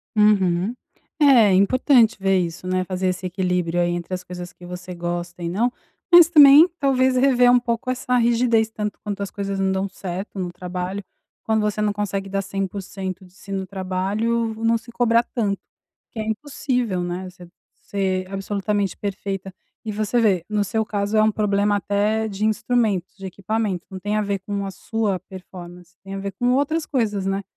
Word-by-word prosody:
Uhum. 200 -1 +3 0.5
É 245 -9 +6
importante 230 +4 +4
ver 195 -1 +2
isso, 170 0 -4
né, 185 0 0
fazer 185 0 -2
esse 185 0 -2
equilíbrio 180 -2 -1
aí 175 - +1
entre 175 +1 -4
as 180 0 -3
coisas 180 -1 -8
que 175 - -14
você 180 0 -8
gosta 175 0 -4
e 170 - -2
não, 230 +7 +1 0.4
mas 345 -1 +9
também 295 0 +9
talvez 260 -2 +2
rever 250 -2 +5
um 245 - +5
pouco 235 +1 -2
essa 250 0 0
rigidez 235 -1 +2
tanto 210 -2 -4
quanto 205 -1 -4
as 200 - -3
coisas 200 -1 -4
não 190 0 +1
dão 190 +1 -1
certo 190 +1 -6
no 180 -1 -3
trabalho, 180 +2 -5 0.4
quando 220 -1 +1
você 210 0 -1
não 210 - +2
consegue 200 -1 -3
dar 195 0 -1
100% 195 -1 -5
de 180 - -20
si 195 +1 -13
no 190 -1 -3
trabalho, 200 +5 -1
não 230 0 +3
se 235 +1 -13
cobrar 235 -1 +3
tanto, 210 -5 -2 0.5
que 225 - -7
é - - -1
impossível, 245 -5 -2
né, 180 +1 -4
você 180 -1 -14 0.3
ser 190 -1 -3
absolutamente 200 0 -2
perfeita, 195 -1 -4 0.3
e 215 - -2
você 215 +3 0
vê, 190 -6 +2
no 210 -1 +1
seu 220 +2 -1
caso 205 +1 -1
é 215 - +5
um 215 - +3
problema 205 -1 +1
até 210 +2 0
de 200 +2 -2
instrumentos, 215 -4 0
de 195 - -9
equipamento, 200 0 -2
não 190 - -6
tem 205 +3 -2
a 215 - +2
ver 200 -1 -2
com 200 +1 -4
a 195 - -5
sua 210 -1 -2
performance, 180 -1 -12
tem 195 0 -7
a - - -4
ver 195 0 -4
com 245 +6 0
outras 300 +4 0
coisas, 210 -8 -1
né, 195 +1 -1
200 Hz, 185 wpm, -22 LUFS, 185-220 Hz, 0.5 s, mas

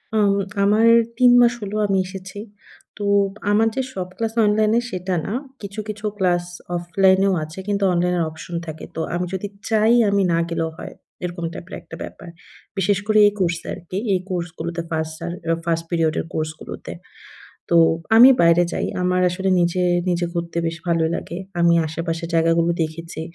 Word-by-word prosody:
অউম 200 -2 +3 0.3
আমার 215 +3 +4 0.3
৩ 250 -1 +6
মাস 240 0 +5
হলো 205 +1 -5
আমি 195 -1 +1
এসেছি। 185 +1 -9 0.6
তো 205 - -5 0.5
আমার 220 +2 +4
যে 265 - +1
সব 185 -1 -4
ক্লাস 225 -1 -2
অনলাইনে, 215 +2 +3
সেটা 185 0 -3
না। 205 - -3 0.3
কিছু, 200 +1 -7
কিছু 210 0 -6
ক্লাস 175 -2 +1 0.3
অফলাইনেও 190 +3 +3
আছে 155 +5 -9
কিন্তু, 200 -1 0
অনলাইনের 175 0 +1
অপশন 155 +2 -9
থাকে। 160 0 -7
তো - - -4
আমি 180 +1 -1
যদি 190 +2 -3 0.2
চাই, 220 +1 +4 0.2
আমি 200 0 +2
না - - +2
গেলেও 165 -1 -1
হয়। - - -8 0.3
এরকম 175 -1 -4
টাইপের 185 - -8
একটা - - -11
ব্যাপার। 175 -3 -10 0.5
বিশেষ 195 +1 +2
করে 215 0 +3
এই 205 - 0
কোর্স 175 -2 +1
আরকি। 175 +2 -6 0.2
এই 185 - +2
কোর্সগুলোতে 170 -1 -4
1st 160 0 -2
সার 170 +1 -5 0.3
1st 165 -1 0
পিরিয়ড 165 -2 +1
এর - - -3
কোর্স 155 0 -1
গুলোতে। - - -8 0.8
তো 170 - +3 0.4
আমি 245 +4 +10
বাইরে 170 +1 +5
যাই। - - -2 0.2
আমার 180 0 +1
আসলে 190 +2 -2
নিজে, 175 +1 +1 0.3
নিজে 175 0 0
ঘুরতে 170 0 -4
বেশ 165 0 -2
ভালোই 165 -1 +2
লাগে। 170 - -6 0.2
আমি 170 0 +5
আশেপাশের 165 +1 -4
জায়গাগুলো 165 +1 +3
দেখেছি। 160 +1 -6
180 Hz, 170 wpm, -21 LUFS, 170-200 Hz, 0.8 s, আমি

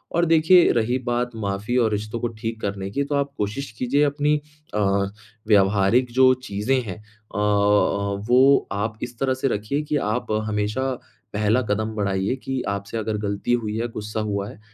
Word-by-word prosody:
और 170 0 +3
देखिए 165 +2 +5
रही 120 +2 +1
बात 120 0 0
माफ़ी 100 +2 -2
और 115 -3 +3
रिश्तों 105 +2 -3
को 120 - -1
ठीक 115 0 -4
करने 100 -1 -3
की, 140 - 0
तो 145 +1 -2
आप 140 0 -1
कोशिश 110 +6 -3
कीजिए 135 +5 +2
अपनी 145 +1 +2 0.4
अ, 105 - 0 0.7
व्यावहारिक 105 +4 +3
जो 130 0 +6 0.2
चीज़ें 105 +7 +1
हैं 100 -7 -6 0.4
अ - - -2
अ, 100 -1 +2
वो 130 +3 +5
आप 105 +2 -2
इस 120 -1 -6
तरह 135 -1 +1
से 130 +1 -1
रखिए 120 +5 -1
कि 150 0 -3 0.2
आप 120 0 -2 0.2
हमेशा, 105 +5 -1 0.4
पहला 105 +4 +2
कदम 110 0 -2
बढ़ाइए 100 +2 0
कि 135 -1 -2
आपसे 100 +3 -3
अगर 110 -1 -2
ग़लती 100 +4 -1
हुई 110 -3 -1
है, 120 - -1
गुस्सा 110 -1 -5
हुआ 100 -1 -2
है, - - -12
110 Hz, 180 wpm, -23 LUFS, 105-130 Hz, 0.7 s, जो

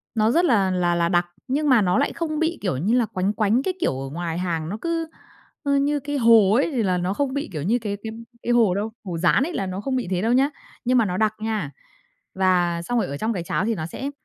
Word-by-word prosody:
nó 220 0 +3
rất 340 +7 +3
là 205 - +3
là 175 -1 +1
là 170 0 +1
đặc, 175 -1 +2 0.2
nhưng 290 +3 0
mà 250 -4 +6
nó 180 -2 +2
lại 280 - +1
không 310 -2 -3
bị, 330 +1 0
kiểu 185 -10 -1
như 190 - 0
là, 240 - +3
quánh 190 0 -1
quánh 215 +5 +1
cái 375 - -1
kiểu 130 - 0
ở 135 - -5
ngoài 165 +2 -4
hàng 165 -3 -2
nó 210 - -4
cứ, 330 -1 -1 0.6
ơ, 280 -1 +1
như 290 +1 +1
cái 290 +1 -3
hồ 225 -5 +6
ấy 275 +8 +2
thì 245 -5 0
là 185 -2 +1
nó 180 +2 -1
không 270 +4 -1
bị 285 +1 -3
kiểu 155 - -3
như 225 +8 +1
cái 205 -2 -3
cái 220 - -4 0.3
cái 240 - 0
hồ 225 -6 +4
đâu, 210 +3 -2
hồ 180 -5 -4
dán 175 +9 +3
ấy 340 +5 -3
là 195 - -2
nó 185 +1 -4
không 265 +3 -2
bị 250 -7 -2
thế 180 -1 0
đâu 225 +3 +2
nhá. 270 +3 +3 0.4
Nhưng 250 +1 +3
mà 230 - +4
nó 180 -2 -2
đặc 215 +1 +2
nha. 215 -9 -2 0.6
Và 180 -3 +2
xong 245 +8 -2
rồi - - -1
ở 140 +1 -5
trong 220 +8 -1
cái 180 -5 -3
cháo 190 - -1
thì 225 0 0
nó 155 - -4
sẽ 265 - -5
215 Hz, 280 wpm, -23 LUFS, 180-260 Hz, 0.6 s, mà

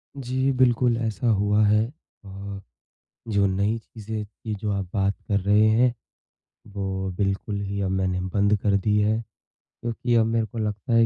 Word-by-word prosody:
जी 130 0 0
बिल्कुल, 125 -2 +3
ऐसा 115 -1 -2
हुआ 105 0 +3
है। 105 +1 +4 0.4
अ, 100 0 -7 0.7
जो 100 -2 +2
नई 100 +4 0
चीज़ें 110 -1 -6
की 110 +1 -7
जो 105 +1 -3
आप 100 -2 -2
बात 100 -1 +1
कर 100 -2 +2
रहे 105 +3 +4
हैं। 120 +3 +4 0.8
वो 95 -1 -3
बिल्कुल 100 +1 -1
ही 100 0 -3
अब 95 -1 0
मैंने 95 -1 0
बंद 100 +3 +2
कर 100 -1 +2
दी 105 +2 +2
हैं। 110 +2 +2 0.6
क्योंकि 120 +1 -1
अब 115 -1 +5
मेरे 115 0 +1
को 110 +2 -10
लगता 110 +2 -2
है 115 0 +6
105 Hz, 170 wpm, -25 LUFS, 100-115 Hz, 0.8 s, है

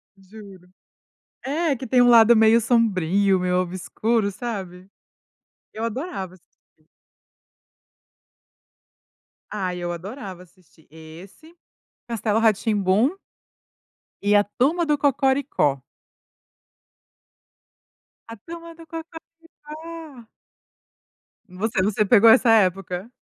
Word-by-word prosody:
Juro. 195 -2 -15 0.7
É, 295 +2 -1
que 260 +1 -8
tem 250 +2 +3
um 245 - +5
lado 235 0 +7
meio 220 +1 +5
sombrio, 200 -4 +1
meio 180 0 0
obscuro, 200 +4 -2
sabe. 190 -4 -7 0.8
Eu 220 - -5
adorava 230 - -5
assistir. 160 -3 -30 2.6
Ai, 185 -4 -4
eu 175 0 -4
adorava 190 0 -9
assistir 175 -3 -26
esse, 170 - -14 0.5
Castelo 225 -2 -1
Rá-Tim-Bum 215 - +1 1.1
e 205 +1 +2
a 205 - +5
Turma 290 - 0
do 300 -1 +1
Cocoricó. 270 - 0 2.5
A 230 - -8
Turma 335 +8 -11
do 330 0 -14 0.6
Cocoricó. 310 -5 -11 1.2
Você 195 +2 -2
você 210 +2 0
pegou 225 +1 +6
essa 245 +1 +5
época? 195 -1 +1
215 Hz, 90 wpm, -22 LUFS, 185-255 Hz, 2.6 s, lado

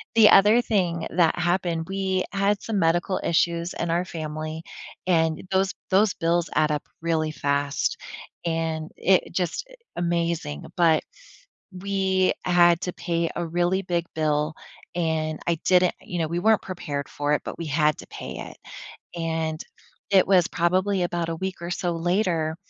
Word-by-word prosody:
the 220 -2 +8
other 210 +5 +6
thing 180 -8 0
that 170 -1 +2
happened, 175 -2 0
we 190 -1 0
had 200 +1 +1
some 220 -3 -2
medical 175 +3 +1
issues 170 +1 +1
in 170 - -3
our 175 +2 +1
family 155 -2 -5 0.5
and 160 -3 +2
those 190 0 +2 0.2
those 200 +1 +4
bills 170 +1 0
add 155 0 +3
up 150 - -1 0.2
really 160 -2 0
fast 140 -1 -1 0.5
and 165 -1 -2
it 190 0 +2
just 180 - -1
i - - -16 0.3
amazing, 170 - -1
but 165 -3 +4 0.7
we 190 0 +1
had 175 -1 +5
to 180 - -3
pay 170 -1 -1
a 175 - -1
really 175 +3 0
big 175 -2 -1
bill 155 0 0 0.4
and 160 -2 -1
I 170 - +2
didn't 180 -1 +4
you 180 - -5
know, 160 - 0
we 170 +2 -2
weren't 220 +3 +3
prepared 145 -6 -5
for 145 0 -1
it, 150 - +1
but - - -6
we 170 - -4
had 150 0 +2
to - - -10
pay - - -7
it. - - -8 0.6
And 160 -1 -2 0.5
it 195 -2 +5
was 185 -3 +4
probably 185 +2 +1
about 175 -1 -1
a 165 - -2
week 190 +1 -4
or 170 +1 -5
so 175 0 -1
later, 170 -2 0
170 Hz, 160 wpm, -25 LUFS, 160-185 Hz, 0.7 s, the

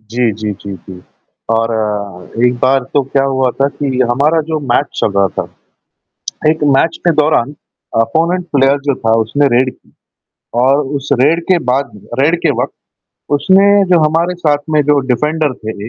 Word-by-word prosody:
जी, 115 +2 -1
जी, 105 0 -4
जी, 100 0 -9
जी। 90 +1 -12 0.5
और 105 -2 -3
एक 125 - +1
बार 130 +1 +2
तो 145 - +3
क्या 135 +1 0
हुआ 130 -2 +1
था 135 +2 0
कि 135 -2 -3
हमारा 150 +6 +2
जो 160 - -1
मैच 140 - +2
चल - - +1
रहा 100 0 +4
था, - - 0 1.1
एक 155 -1 0
मैच 165 +4 +1
के - - +6
दौरान 150 -3 +1 0.5
अपोनेंट 170 +9 0
प्लेयर 135 +1 +3
जो 140 -2 +1
था, 115 -3 -1
उसने 140 +6 +1
रेड 130 0 +1
की - - -29 0.7
और 135 +3 +3 0.2
उस 140 0 -6
रेड 165 +5 +3
के 185 - +5
बाद 135 +2 0 0.3
रेड 160 +5 +3
के - - +2
वक़्त, - - -4 0.6
उसने 195 +6 +4
जो 170 - +5
हमारे 165 +3 0
साथ 155 -5 +1
में 155 - +3
जो 145 - +4
डिफ़ेंडर 150 +4 0
थे, 110 -1 -7
135 Hz, 170 wpm, -14 LUFS, 115-155 Hz, 1.1 s, के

